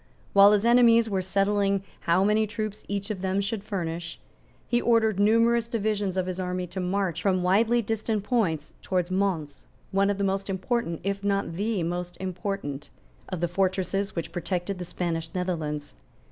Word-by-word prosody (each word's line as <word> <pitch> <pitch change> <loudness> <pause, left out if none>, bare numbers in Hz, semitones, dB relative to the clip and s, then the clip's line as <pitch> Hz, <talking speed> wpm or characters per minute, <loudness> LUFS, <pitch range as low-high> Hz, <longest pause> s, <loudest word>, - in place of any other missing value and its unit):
While 200 +1 +8
his 210 +1 +2
enemies 235 -2 +5
were 190 -1 +1
settling 195 +1 +1 0.2
how 170 +3 +2
many 215 +2 +3
troops 215 0 -4
each 200 +1 -3
of 195 -3 -5
them 190 +1 0
should 200 +1 -2
furnish, 170 -5 -4 0.5
he 240 0 +2
ordered 220 -4 +3
numerous 230 +2 +4
divisions 210 -4 -1
of 185 - +1
his 185 0 -4
army 180 0 -2
to 190 - -3
march 185 -2 -1
from 185 -2 +1
widely 225 +6 +3
distant 220 -1 -1
points 190 - 0
towards 180 -1 -1
Mons, 185 -6 -1 0.2
one 195 +1 +2
of 205 - 0
the 200 - -1
most 195 0 -1
important, 190 -2 -1
if 200 +1 -2
not 200 -3 0
the 205 +1 -1
most 175 +1 -3
important, 185 -6 -4 0.4
of 185 -3 -4
the 175 - +2
fortresses 190 +2 -1
which 170 -1 -4
protected 180 +2 -3
the 180 - -4
Spanish 165 -2 -3
Netherlands. 160 -5 -3
195 Hz, 170 wpm, -26 LUFS, 180-210 Hz, 0.5 s, While